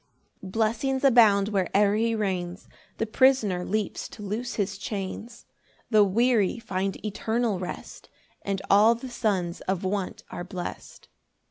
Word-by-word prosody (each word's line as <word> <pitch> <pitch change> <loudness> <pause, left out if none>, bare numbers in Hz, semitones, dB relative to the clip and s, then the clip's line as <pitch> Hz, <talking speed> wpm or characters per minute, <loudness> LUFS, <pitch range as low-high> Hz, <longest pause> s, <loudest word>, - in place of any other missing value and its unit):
6 190 - -8
Blessings 230 +6 0
abound 220 -6 +5
where'er 200 +1 +2
he 230 +1 +1
reigns, 185 -3 -3 0.3
The 225 - 0
prisoner 220 -6 +3
leaps 215 +2 -2
to 210 - -10
lose 225 +5 -3
his 195 -2 -2
chains, 210 +4 -6 0.5
The 215 -2 +6
weary 220 +1 +2
find 195 -3 -2
eternal 220 0 -1
rest, 180 -1 -7 0.3
And 195 -1 -3
all 215 +4 +6
the 255 +3 -8
sons 190 -8 -1
of 190 -1 -1
want 190 0 -3
are 175 - -5
blest. 180 -1 -7
205 Hz, 135 wpm, -26 LUFS, 190-230 Hz, 0.5 s, The